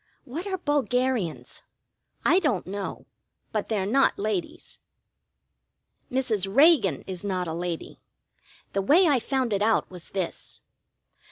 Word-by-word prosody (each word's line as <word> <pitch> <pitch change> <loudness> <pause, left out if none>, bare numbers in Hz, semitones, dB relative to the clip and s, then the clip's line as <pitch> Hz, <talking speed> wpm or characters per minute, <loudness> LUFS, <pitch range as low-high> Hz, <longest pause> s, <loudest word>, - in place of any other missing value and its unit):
What 325 +10 -6
are 380 -1 -2
bulgarians? 255 - -1 0.6
I 365 - +5
don't 225 - 0
know. 200 +1 -5 0.5
But 215 -2 -2
they're 205 -4 0
not 265 +7 +3
ladies. 200 -3 -3 1.3
Mrs. 220 -7 0
Reagan 285 - +5
is 185 -1 -5
not 185 -3 -1
a 160 - -3
lady. 170 0 -5 0.7
The 195 - +1
way 320 - +5
I 280 -5 +4
found 255 -1 -1
it 200 - 0
out 220 -2 +2
was 180 -2 -9
this. 185 -3 -5
215 Hz, 125 wpm, -26 LUFS, 190-270 Hz, 1.3 s, I